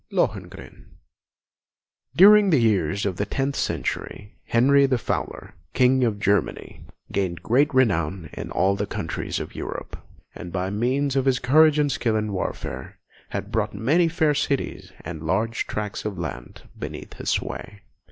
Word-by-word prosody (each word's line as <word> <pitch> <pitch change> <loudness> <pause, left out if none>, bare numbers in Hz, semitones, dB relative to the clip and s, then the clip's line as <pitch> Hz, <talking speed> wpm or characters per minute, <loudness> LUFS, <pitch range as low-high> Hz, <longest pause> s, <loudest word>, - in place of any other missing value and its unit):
LOHENGRIN - - -3 1.3
During 205 +2 +8
the 160 - +4
early 115 -3 +4
years 100 -1 0
of 95 -3 -2
the 100 - 0
tenth 135 +5 -1
century, 105 +1 -3
Henry 140 +4 +4
the 130 -2 +1
Fowler, - - -4 0.2
King 130 +1 +4
of 110 -4 0
Germany, 105 -2 -1 0.3
gained 90 -3 -2
great 140 +6 +3
renown 95 - +1
in - - -6
all 95 +1 +2
the 100 +1 -3
countries - - -4
of - - -7
Europe, - - -6 0.4
and 85 - -8
by 95 +1 -2
means 130 +6 0
of 135 -1 +1
his 130 -2 +3
courage 155 +4 +5
and 145 -1 +2
skill 115 -3 0
in 105 -1 -1
warfare, 95 - -5 0.3
had - - -5
brought - - -1
many 160 +9 +3
fair 160 -2 +2
cities 140 -1 -2
and 80 -2 -7
large 110 +8 -1
tracts 105 -1 -4
of 105 -3 -4
land 75 -8 -7 0.2
beneath - - -7
his - - -4
sway. 100 0 -3
115 Hz, 155 wpm, -24 LUFS, 100-140 Hz, 1.3 s, During